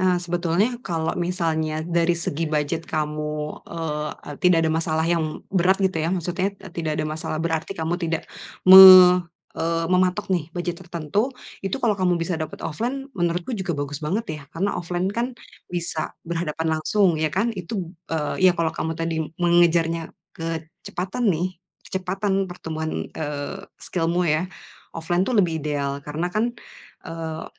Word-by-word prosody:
Nah, 185 -1 +3
sebetulnya 175 +7 0
kalau 165 -6 -2
misalnya 160 -3 -1
dari 170 0 +1
segi 165 -1 -2
budget 155 +2 -1
kamu, 150 0 -3
eee, 150 -2 -3 0.3
tidak 175 -3 +4
ada 160 - +2
masalah 160 0 0
yang 165 -2 -1
berat 190 0 +4
gitu 190 -4 0
ya, 160 - 0
maksudnya, 185 +2 -1
eee, 190 -2 -12
tidak 160 -3 -2
ada 155 - -1
masalah 155 0 -3
berarti 165 +3 -2
kamu 160 +1 -1
tidak 165 -2 -1 0.4
me 185 -1 +11 0.3
eee, 165 0 -1
mematok 185 +2 +2
nih 165 -4 0
budget 175 0 -3
tertentu, 175 - -1 0.3
itu 195 +3 -2
kalau 235 -5 +2
kamu 185 -3 +1
bisa 165 0 -2
dapet 155 0 -5
offline, 245 - -3
menurutku 175 +4 -1
juga 190 -7 -2
bagus 145 0 -4
banget 190 +10 -1 0.2
ya. - - -12
Karena 190 +7 -1
offline 180 +3 -2
kan 240 +2 -2 0.3
bisa 170 -3 -3
berhadapan 165 -1 -2
langsung, 180 -2 +2
ya 155 - +2
kan. 200 +9 0
Itu, 185 -2 -5 0.2
eee, 165 +4 +2
iya 180 - +2
kalau 165 -1 0
kamu 160 0 -3
tadi 165 -1 -1 0.2
mengejarnya 170 -1 +3 0.2
kecepatan 165 +6 -4
nih, 180 0 -1 0.2
kecepatan 190 +1 -1
pertumbuhan, 160 -3 -5
eee, 145 -2 -4 0.2
skill-mu 175 +1 -1
ya, 160 +3 +1 0.5
offline 170 +2 0
itu 225 +5 +1
lebih 165 -5 +2
ideal 140 -2 -2
karena 155 +5 -3
kan, 235 +4 0 0.5
eee, 165 -1 -5
170 Hz, 150 wpm, -23 LUFS, 160-185 Hz, 0.5 s, me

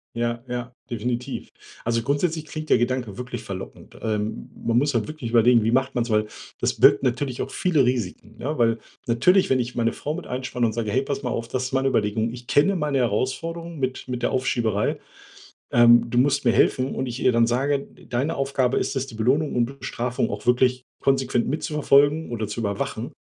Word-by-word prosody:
Ja, 120 0 -2
ja, 120 0 -5 0.2
definitiv. 120 +3 -3 0.3
Also 115 0 +1
grundsätzlich 155 +5 -1
klingt 155 0 -7
der - - +6
Gedanke 120 -4 -1
wirklich 125 -2 -6
verlockend. 95 -1 -8
Ähm, 110 -1 -3
m - - -14
man 115 0 +3
muss 145 +1 +1
halt 110 -3 0
wirklich 155 -6 -6
überlegen: 115 0 +5
„Wie 115 - +1
macht 130 +1 +1
man's?“ 120 -1 0
Weil 105 0 +2 0.3
das - - -1
birgt 105 - +6
natürlich 125 0 -1
auch 135 - -4
viele 155 -8 +2
Risiken, 115 -2 -3
ne, 145 +4 -3
weil 115 -1 +2 0.3
natürlich, 180 +12 +3
wenn 130 -1 +3
ich 120 0 -3
meine 115 -1 +1
Frau 150 - -4
mit 175 +2 -6
einspanne 125 -1 -2
und 110 - 0
sage: 110 -2 -2
„Hey, 130 +5 +2
pass 140 0 -4
mal 125 - -1
auf, 115 -1 -3
das 130 0 -2
ist 130 - -6
meine 135 0 +2
Überlegung. 110 0 0
Ich 120 0 -10
kenne 195 +8 +3
meine 150 -5 0
Herausforderung 165 +9 -2
mit 130 -1 -3
mit 125 -1 -4
der - - +1
Aufschieberei. 115 -5 0 0.7
Ähm, 120 0 +6
du 120 - +1
musst 140 +1 +2
mir 120 - +4
helfen“, 130 +3 +2
und 130 - -2
ich 120 +1 -5
ihr 125 - +3
dann 115 0 +4
sage: 135 +4 +1
„D - - -16
deine 135 +7 -1
Aufgabe 135 -2 +1
ist - - -2
es, 135 +1 -1
die 120 - -11
Belohnung 130 +8 +1
und 125 +3 -1
Bestrafung 125 -1 -2
auch 105 +2 -6
wirklich 125 +1 +3 0.2
konsequent 130 -3 +1
mitzuverfolgen 150 0 +2
oder 110 -3 -3
zu 105 +3 -4
überwachen“. 100 -2 -3
125 Hz, 205 wpm, -24 LUFS, 115-135 Hz, 0.7 s, der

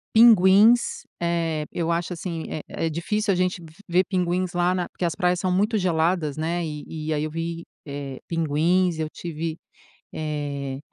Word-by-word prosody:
Pinguins, 220 +1 +6 0.2
eh, 165 -3 0
eu 170 -1 -1
acho 170 +2 -1
assim, 165 -1 -4
é 155 - -4 0.2
é 160 - 0
difícil 205 +6 0
a - - +2
gente 180 -1 0
v 160 - -13 0.2
ver 180 +2 +3
pinguins 180 -1 0
lá 175 +1 +2
na 180 -1 -1
porque 175 - -3
as 165 - -1
praias 180 +1 +1
são 185 - 0
muito 210 +4 +2
geladas, 165 -4 +1
né, 170 +2 -1
e 155 +1 -6
e 155 - +1
aí 150 0 -1
eu 155 - -3
vi, 165 +1 -4 0.2
eh, 140 -2 -5
pinguins. 165 +2 +1
Eu 155 - -1
tive 165 0 -5 0.6
eh, 145 -3 -3
170 Hz, 175 wpm, -24 LUFS, 155-180 Hz, 0.6 s, Pinguins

